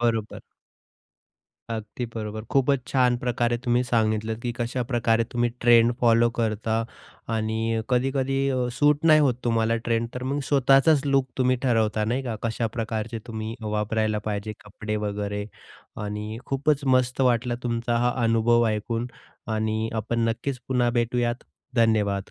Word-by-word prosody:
बरोबर. 115 -2 -1 1.3
अगदी 110 +2 -4
बरोबर. 110 0 -5
खूपच 140 0 +2
छान 125 -2 +2
प्रकारे 120 -1 0
तुम्ही 120 0 +2
सांगितलं 110 -2 0
की 120 0 -3
कशाप्रकारे 120 -1 0
तुम्ही 120 0 +1
ट्रेंड 120 0 +5
फॉलो 115 0 +4
करता 110 -1 -1 0.6
आणि 110 +1 -1
कधी-कधी 135 +2 +1
अ, 130 -2 0
सूट 150 +2 +3
नाही 155 -1 +7
होत 135 -4 +3
तुम्हाला 115 -1 +2
ट्रेंड, 115 0 -1
तर 125 - -5
मग 140 +3 -1
स्वतःचाच 135 +2 +4
लूक 135 -1 +2
तुम्ही 130 0 +2
ठरवता 110 -4 +1
नाही 120 +5 -1
का. 120 -4 -4
कशा 115 0 -1
प्रकारचे 115 0 -3
तुम्ही 110 -1 -5
वापरायला 110 0 -1
पाहिजे 105 0 -3
कपडे 105 +1 -5
वगैरे. 105 0 -3 0.5
आणि 105 +1 -5
खूपच 140 +1 0
मस्त 130 0 +2
वाटला 125 -1 +2
तुमचा 120 0 -1
हा 120 +1 +2
अनुभव 115 +1 +3
ऐकून 115 +2 -2 0.5
आणि 110 +1 -1
आपण 115 +1 0
नक्कीच 125 +4 -3
पुन्हा 125 -2 +2
भेटूयात. 120 0 -1 0.3
धन्यवाद. 105 -4 +1
115 Hz, 135 wpm, -25 LUFS, 110-125 Hz, 1.3 s, नाही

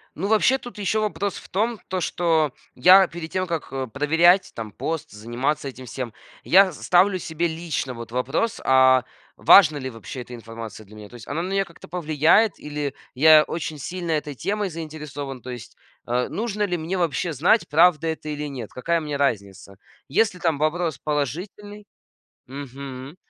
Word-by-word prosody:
Ну, 190 +6 -3
вообще, 220 +5 +4
тут 245 -4 -11
еще 210 +2 0
вопрос 200 -2 -2
в - - -12
том, 220 +3 -1
то 185 -1 -2
что 160 -4 +1 0.2
я 185 +8 +7
перед 170 -1 -7
тем, 185 0 -1
как, 165 -2 -4
э, 135 -1 -3
проверять 165 - +3
там 110 -2 -6
пост, 160 +8 -4
заниматься 125 +7 -2
этим 130 -1 -9
всем, 120 -2 -6 0.3
я 190 0 +5
с 150 - -12
ставлю 185 +2 +3
себе 165 0 -2
лично 160 -5 -3
вот 115 -1 -9
вопрос: 130 - -1
"А 130 -1 +5 0.3
важна 155 -7 +7
ли 130 -1 -4
вообще 125 +2 -8
эта 125 0 -10
информация 115 -2 -9
для 105 +2 -16
меня?" 105 -1 -11
То - - -20
есть 120 -1 -12
она 155 +4 -2
на 185 - -4
меня 195 0 +2
как-то 170 - -15
повлияет 165 +5 +2
или 145 -2 -4 0.2
я 155 +3 +7
очень 155 -2 -5
сильно 175 +4 -4
этой 150 -2 -1
темой 200 +6 -2
заинтересован? 150 -5 -7
То 125 - -7
есть, 120 -3 -10 0.3
э, 125 +1 0
нужно 210 -1 -2
ли 180 -3 0
мне 165 +4 -3
вообще 170 0 -1
знать, 175 - +2
правда 165 +1 +4
это 160 -1 -4
или 150 0 -4
нет, 125 -6 -7
какая 170 +7 -1
мне 150 -2 -4
разница? 100 -8 -2 0.3
Если 185 +5 +1
там 165 -4 +1
вопрос 160 +2 -1
положительный 180 - -4 0.6
Мгм. 135 +1 -8
155 Hz, 180 wpm, -23 LUFS, 130-180 Hz, 0.6 s, я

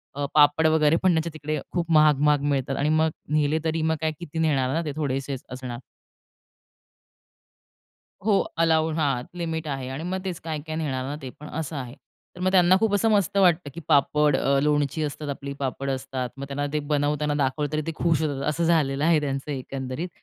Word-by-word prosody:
अ, 145 0 -2
पापड 150 +1 +5
वगैरे 155 0 +4
पण 185 - +5
त्यांच्या 160 +1 0
तिकडे 155 -1 -3
खूप 170 -1 -2
महाग-महाग 150 -2 +4
मिळतात 135 0 -1
आणि 150 +2 +1
मग 160 +1 +3 0.2
नेले 155 +1 +2
तरी 160 0 0
मग 160 0 +1
काय 160 0 +1
किती 165 -1 -6
नेणार 135 -4 +1
ना? 165 - +1
ते 150 - -2
थोडेसेच 135 -2 -2
असणार. 125 -1 -6 2.5
हो 205 -3 +4 0.2
अलाऊ 160 -1 +3
हां 140 -6 0
लिमिट 160 -2 -3
आहे 135 -2 -3
आणि 135 +5 -5
मग 185 +2 -2
तेच 180 -3 -3
काय-काय 155 -1 -5
नेणार 135 -5 -2
ना 145 +2 -4
ते 130 - -6
पण 150 - -9
असं 160 0 -5
आहे. 130 -1 -6 0.4
तर - - -12
मग 185 0 +2
त्यांना 185 -1 +5
खूप 220 -2 +1
असं 225 +2 +2
मस्त 200 -2 +2
वाटतं 175 -5 +3
की - - -7
पापड, 150 0 +3
अ, 140 0 +2
लोणची 150 +1 +1
असतात, 145 0 -4
आपली 140 0 -5
पापड 135 0 -3
असतात. 130 -1 -3
मग 140 - -5
त्यांना 145 +1 -2
ते 150 - +1
बनवताना 145 0 0
दाखवलं 145 +1 -1
तरी 155 0 0
ते - - 0
खुश 165 -2 +1
होतात. 145 -3 -2
असं 170 +3 -1
झालेलं 150 -4 +2
आहे 165 -2 +4
त्यांचं 140 +1 -3
एकंदरीत 135 +4 -4
150 Hz, 195 wpm, -25 LUFS, 140-160 Hz, 2.5 s, पापड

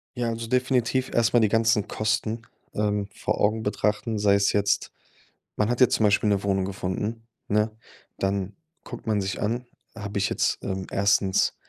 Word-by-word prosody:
Ja, 120 -2 -1
also, 115 0 -4
definitiv 130 +1 +1
erstmal 115 0 +3
die 110 - +3
ganzen 110 -1 +2
Kosten, 110 +1 -1 0.3
ähm, 105 -1 0
vor - - -2
Augen 110 +2 +1
betrachten. 105 +2 -1
Sei 100 -1 +4
es 100 0 +3
jetzt 100 0 +1 0.6
man 105 +1 +1
hat 120 - 0
jetzt 125 - +6
zum 110 - +2
Beispiel 105 +1 +3
'ne 100 -1 +1
Wohnung 95 -1 +1
gefunden, 105 +4 -4 0.2
ne? 105 +1 +2 0.5
Dann 95 0 -1 0.3
guckt 120 - -9
man 105 -3 +1
sich 95 0 -3
an, 120 +4 -1 0.3
habe 105 -2 -5
ich 100 - +2
jetzt, - - +1
ähm, 95 -1 -3
1. 100 -1 +2
105 Hz, 170 wpm, -25 LUFS, 100-115 Hz, 0.6 s, jetzt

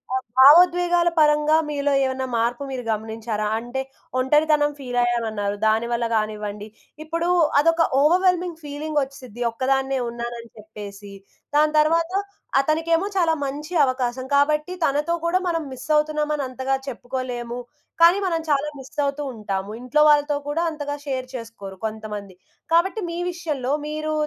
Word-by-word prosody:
ఆ - - +3 0.2
భావోద్వేగాల 350 +4 +6
పరంగా, 300 0 +4
మీలో 285 -1 0
ఏవన్నా 260 0 -1
మార్పు 235 +4 0
మీరు 255 -2 -4
గమనించారా? 220 0 -3
అంటే 245 +3 -4 0.4
ఒంటరితనం 295 +2 +3
ఫీలయ్యానన్నారు, 235 -5 -1
దానివల్ల 235 +2 +1
గానివ్వండి, 210 -1 -3 0.4
ఇప్పుడు 335 +2 -2 0.3
అదొక 330 +2 +3 0.2
ఓవర్‌వెల్మింగ్ 355 +1 +2
ఫీలింగొచ్చిసిద్ది, 280 -5 -4
ఒక్కదాన్నే 270 +2 0
ఉన్నానని 235 0 -6
చెప్పేసి. 205 -1 -10 0.4
దాని 305 +1 +3
తరవాత, 330 +3 +3 0.5
అతనికేమో 330 +5 +1
చాలా 330 -3 +3
మంచి 300 +5 -5
అవకాశం, 255 0 -2
కాబట్టి 300 +5 +2
తనతో 300 +5 +1
కూడా 365 +2 +2
మనం 330 -2 0
మిస్సవుతున్నామని 300 0 0
అంతగా 260 +1 -2
చెప్పుకోలేము, 245 -1 -5 0.4
కానీ 345 +3 +7
మనం 330 -2 0
చాలా 285 0 +2
మిస్సవుతూ 280 +2 -3
ఉంటాము. 200 -1 -4
ఇంట్లో 300 +5 +3
వాళ్ళతో 290 0 +3
కూడా, 325 +4 0
అంతగా 290 -1 -4
షేర్ 260 -2 -3
చేసుకోరు 225 -5 -8
కొంతమంది. 210 -3 -6 0.4
కాబట్టి 380 +6 +3
మీ 340 - -4
విషయంలో, 295 -6 -3
మీరు 310 0 -3
275 Hz, 120 wpm, -23 LUFS, 235-310 Hz, 0.5 s, కానీ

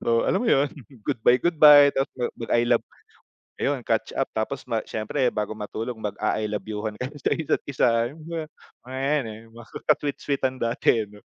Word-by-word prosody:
So, 115 0 +2
alam - - +1
mo 245 - 0
'yon, 140 -7 +4 0.4
goodbye, 120 +2 +3
goodbye, 150 -3 +7
tapos 135 0 -1 0.2
mag-I 120 0 +1
love, - - +3 0.7
ayun 140 -1 -1
catch-up 115 +4 0
tapos 110 +5 -3
ma 115 -2 -1
siyempre 125 +4 -1
bago 105 0 -3
matulog 110 +3 -5
mag-a-I 105 0 -2
love 105 0 -4
you-han 105 0 -4
kayo 130 +4 -5
sa - - 0
isa't 160 -3 0
isa, 130 - +2 0.2
yung 155 - -14
mga, 165 -2 -4 0.5
eh, 130 +1 -3 0.4
'yan 115 - -22
maka 120 -1 0
sweet-sweetan 140 -2 -2
dati 115 -1 +1
ano. 105 0 -16
120 Hz, 165 wpm, -25 LUFS, 110-140 Hz, 0.7 s, goodbye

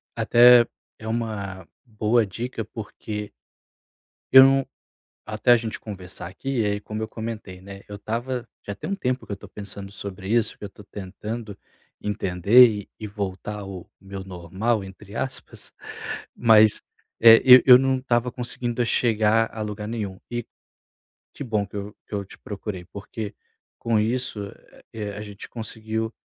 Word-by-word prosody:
até 120 0 +7 0.3
é 110 - -8
uma 100 -6 -4 0.2
boa 110 0 +2
dica 115 +4 -5
porque 105 -1 -7 1.0
Eu 130 0 +11
não 135 0 +4 0.6
até 110 +3 +2
a 120 - +8
gente 115 -1 -5
conversar 90 -4 -8
aqui, 120 +6 -2
eh, 105 0 0
como 105 +1 -6
eu 110 - -2
comentei, 110 -4 -7
né, 100 +1 -10
eu 105 - -7
estava 120 +4 -3
já 100 - -6
tem - - -6
um - - +1
tempo 130 -9 -2
que - - -10
eu - - 0
estou 100 - -13
pensando 100 -1 -8
sobre 100 -1 -8
isso, 115 -1 +1
que - - -13
eu - - -3
estou 105 0 -15
tentando 105 +2 -7 0.4
entender 105 +4 +5
e 105 -3 -4
e 110 - -5
voltar 105 0 -5
ao 95 -2 -8
meu 95 0 -8
normal, 95 +5 -2
entre 100 +2 -12
aspas, 130 +2 -5 0.6
mas, 110 -2 +5 0.4
eh, 115 0 +9
eu 125 0 +10
eu 125 -2 +10
não 135 0 +2
estava 125 -1 0
conseguindo 120 -1 -2
chegar 115 -1 +2
a 110 - -5
lugar 105 0 -4
nenhum. 105 -5 -4
E 120 -1 -3 0.9
que - - -7
bom 105 -4 -1
que 100 - -10
eu 100 +1 -6
eu 100 -2 -3
te - - -15
procurei, 100 -3 -6
porque, 105 +1 -7 0.4
com 115 -2 +1
isso, 120 0 -1 0.5
eh, 105 -2 -5
a 105 - -6
gente 105 -1 -10
conseguiu 110 0 -4
110 Hz, 160 wpm, -24 LUFS, 100-120 Hz, 1.0 s, Eu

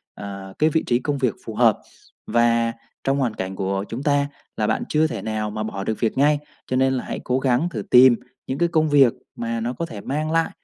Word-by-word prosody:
ờ, 100 -1 -8
cái 155 - +4
vị 160 +1 +1
trí 120 0 +2
công 145 +2 -2
việc 125 -6 +1
phù - - -6
hợp. - - +4 0.5
Và 115 0 +2 0.3
trong 135 +1 +1
hoàn 125 -5 0
cảnh 95 -2 -5
của 95 +1 -1
chúng 125 +4 -5
ta 145 -1 +2 0.3
là 105 - +1
bạn - - 0
chưa 155 +1 +3
thể 115 -9 -5
nào 110 0 -2
mà 110 +1 -4
bỏ 100 -3 -4
được 110 +1 -2
việc 115 +2 0
ngay, 145 +2 +4 0.3
cho 130 - -1
nên 130 +1 +3
là 130 - -2
hãy - - -5
cố 125 +1 0
gắng 130 +5 +1
thử 110 -10 -4
tìm 125 0 +8 0.3
những 130 - -2
cái 170 +2 +2
công 155 -2 +2
việc 140 -5 +5 0.2
mà 115 0 -3
nó 120 +2 -2
có 170 - -3
thể 105 -9 -8
mang 155 +6 -2
lại 165 0 +2
125 Hz, 245 wpm, -22 LUFS, 110-145 Hz, 0.5 s, tìm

